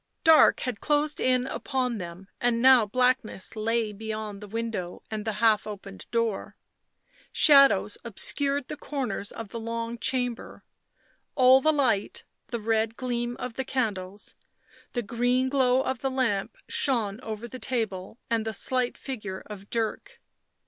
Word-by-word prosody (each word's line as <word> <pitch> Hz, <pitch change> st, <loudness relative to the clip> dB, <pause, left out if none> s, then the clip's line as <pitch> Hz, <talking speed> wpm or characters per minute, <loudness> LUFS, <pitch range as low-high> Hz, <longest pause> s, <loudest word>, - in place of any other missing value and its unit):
Dark 320 Hz, -2 st, +6 dB
had 250 Hz, -5 st, -3 dB
closed 300 Hz, 0 st, +1 dB
in 255 Hz, -1 st, +2 dB
upon 255 Hz, -4 st, -2 dB
them 175 Hz, +1 st, -8 dB
and 240 Hz, -1 st, +2 dB
now 255 Hz, -3 st, +6 dB
blackness 250 Hz, -3 st, 0 dB
lay 220 Hz, 0 st, 0 dB
beyond 215 Hz, -1 st, -5 dB
the 210 Hz, -, -8 dB
window 220 Hz, -5 st, -4 dB
and 215 Hz, -1 st, -4 dB
the 220 Hz, -, -1 dB
half 215 Hz, 0 st, +3 dB
open 195 Hz, -2 st, -8 dB
door; 230 Hz, -4 st, -1 dB, 0.8 s
shadows 275 Hz, -9 st, +5 dB
obscured 275 Hz, +5 st, 0 dB
the -, -, -5 dB
corners 260 Hz, -9 st, -4 dB
of 225 Hz, -3 st, -7 dB
the 230 Hz, -, -6 dB
long 230 Hz, +1 st, -4 dB
chamber; 250 Hz, -2 st, -2 dB, 0.7 s
all 260 Hz, 0 st, +6 dB
the 310 Hz, -, +4 dB
light, 250 Hz, -9 st, 0 dB, 0.2 s
the 235 Hz, -, -3 dB
red 225 Hz, 0 st, 0 dB
gleam 240 Hz, -1 st, -2 dB
of 250 Hz, -2 st, -5 dB
the 265 Hz, -, -3 dB
candles, 205 Hz, -7 st, -3 dB, 0.6 s
the 240 Hz, -, -1 dB
green 245 Hz, +4 st, +1 dB
glow 260 Hz, -2 st, +3 dB
of 260 Hz, -2 st, -2 dB
the 270 Hz, -, -1 dB
lamp, 255 Hz, -, -1 dB
shone 225 Hz, -6 st, +1 dB
over 220 Hz, 0 st, -6 dB
the 255 Hz, +2 st, -8 dB
table 220 Hz, -5 st, -2 dB
and 230 Hz, -1 st, 0 dB
the 220 Hz, 0 st, -3 dB
slight 255 Hz, +1 st, 0 dB
figure 210 Hz, -8 st, -6 dB
of 205 Hz, -1 st, -10 dB
Dirk. 230 Hz, -, -3 dB
230 Hz, 150 wpm, -27 LUFS, 215-255 Hz, 0.8 s, Dark